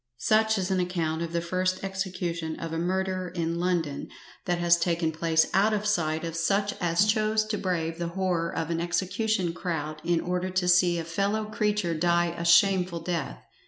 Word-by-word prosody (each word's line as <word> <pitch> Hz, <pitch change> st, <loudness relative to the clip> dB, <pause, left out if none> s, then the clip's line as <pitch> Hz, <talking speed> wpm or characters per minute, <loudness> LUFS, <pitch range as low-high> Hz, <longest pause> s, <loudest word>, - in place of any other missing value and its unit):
Such 220 Hz, -, +2 dB
is 190 Hz, 0 st, -1 dB
an 190 Hz, -, +2 dB
account 170 Hz, -3 st, -1 dB
of 170 Hz, -1 st, -3 dB
the 170 Hz, 0 st, -1 dB
first 185 Hz, +2 st, -1 dB
execution 180 Hz, -4 st, -3 dB
of 165 Hz, -1 st, -5 dB
a 165 Hz, -, -1 dB
murderer 185 Hz, +1 st, -1 dB
in 170 Hz, -1 st, -2 dB
London 170 Hz, -5 st, -1 dB, 0.4 s
that 175 Hz, -1 st, 0 dB
has 175 Hz, 0 st, +4 dB
taken 170 Hz, -1 st, 0 dB
place 160 Hz, 0 st, +2 dB
out 205 Hz, +3 st, +3 dB
of 210 Hz, 0 st, -3 dB
sight 160 Hz, -6 st, 0 dB
of 165 Hz, -1 st, -4 dB
such 200 Hz, +5 st, +1 dB
as 175 Hz, +3 st, +3 dB
chose 215 Hz, 0 st, +2 dB
to 215 Hz, 0 st, -2 dB
brave 165 Hz, -3 st, -2 dB
the 170 Hz, -, -2 dB
horrore 180 Hz, -3 st, 0 dB
of 165 Hz, 0 st, -3 dB
an 165 Hz, 0 st, -1 dB
execution 185 Hz, +2 st, -1 dB
crowd 155 Hz, -4 st, -4 dB
in 170 Hz, 0 st, +1 dB
order 180 Hz, +2 st, -2 dB
to 185 Hz, -1 st, 0 dB
see 175 Hz, -1 st, +4 dB
a 165 Hz, -, -2 dB
fellow 200 Hz, +6 st, -1 dB
creature 210 Hz, -4 st, 0 dB
die 170 Hz, +1 st, +1 dB
a 170 Hz, -, -4 dB
shameful 175 Hz, 0 st, +4 dB
death. 170 Hz, -6 st, -4 dB
175 Hz, 190 wpm, -27 LUFS, 165-190 Hz, 0.4 s, has